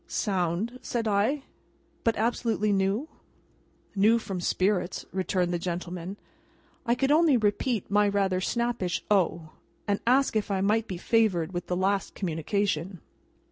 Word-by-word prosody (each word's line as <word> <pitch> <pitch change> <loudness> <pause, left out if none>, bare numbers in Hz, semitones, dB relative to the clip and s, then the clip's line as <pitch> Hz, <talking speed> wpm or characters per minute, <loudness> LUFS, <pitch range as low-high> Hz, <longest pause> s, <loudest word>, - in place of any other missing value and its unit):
'" - - -37
"Sound," 195 +4 -1
said 230 -2 -2
I; 215 +8 +1 0.6
"but, 230 - +2
absolutely 220 -2 0
new?" 195 +8 0 0.9
"New 215 +4 +5
from 195 -5 -4
spirits," 185 0 0
returned 185 -1 0
the 175 - 0
gentleman. 180 +2 -5 0.7
I 235 - +3
could 270 +3 +1
only 310 -3 +5
repeat 215 0 0
my 205 0 +4
rather 195 -2 +1
snappish 235 -6 -1
"O!" 170 -5 +1 0.4
and 205 -1 +1
ask 265 0 +3
if 215 -1 0
I 195 -1 0
might 215 +3 +1
be 185 - -5
favoured 190 -5 +1
with 175 0 -4
the 180 - -1
last 195 +1 0
communication. 180 0 -2
200 Hz, 140 wpm, -27 LUFS, 180-225 Hz, 0.9 s, New